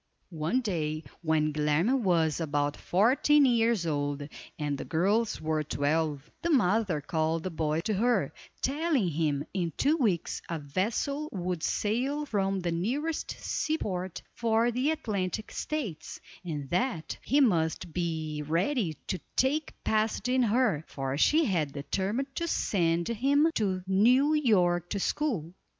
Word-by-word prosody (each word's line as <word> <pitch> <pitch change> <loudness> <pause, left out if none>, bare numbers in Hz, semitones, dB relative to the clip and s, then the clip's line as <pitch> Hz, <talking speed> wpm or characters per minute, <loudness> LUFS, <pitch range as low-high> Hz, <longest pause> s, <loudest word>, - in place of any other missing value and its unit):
One 165 +11 0
day, 155 -8 -2 0.2
when 155 -2 +1
Guilerme 155 - +2
was 165 -6 +2
about 145 -2 0
fourteen 265 +9 +3
years 230 -6 +2
old, 145 -2 -2 0.3
and 145 -2 -1
the - - -5
girls 205 +7 +1
were 155 -1 -1
twelve, 150 0 -1
the 340 - -1
mother 205 - +2
called 160 +2 -1
the 185 - -3
boy 155 0 -1
to 215 - -1
her, 240 +5 +1 0.3
telling 285 - +1
him 150 -2 0
in 175 -4 -1
two 300 +4 +3
weeks 205 - 0
a 165 - -2
vessel 220 - -2
would 180 -3 -3
sail 260 - 0
from 195 -6 0
the 175 -1 -1
nearest 265 - -2
sea 315 0 -1
port 185 - -4
for 230 +1 +2
the 255 +5 0
Atlantic 210 - -2
States, 205 - -4 0.2
and 150 -5 -4
that, 180 -4 -1
he 280 +5 +2
must 170 - +1
be 160 -3 -2
ready 175 - 0
to 185 - -3 0.2
take 285 +4 +1
passage 220 +1 0
in 255 0 +3
her, 220 - +2
for 135 -1 -3
she 305 - +4
had 160 - 0
determined 200 - -2
to 335 - -1
send 170 - +1
him 280 +7 +2
to 190 - -1
New 245 +10 +4
York 180 - +2
to 200 - -2
school. 195 - -1
185 Hz, 145 wpm, -29 LUFS, 160-245 Hz, 0.3 s, she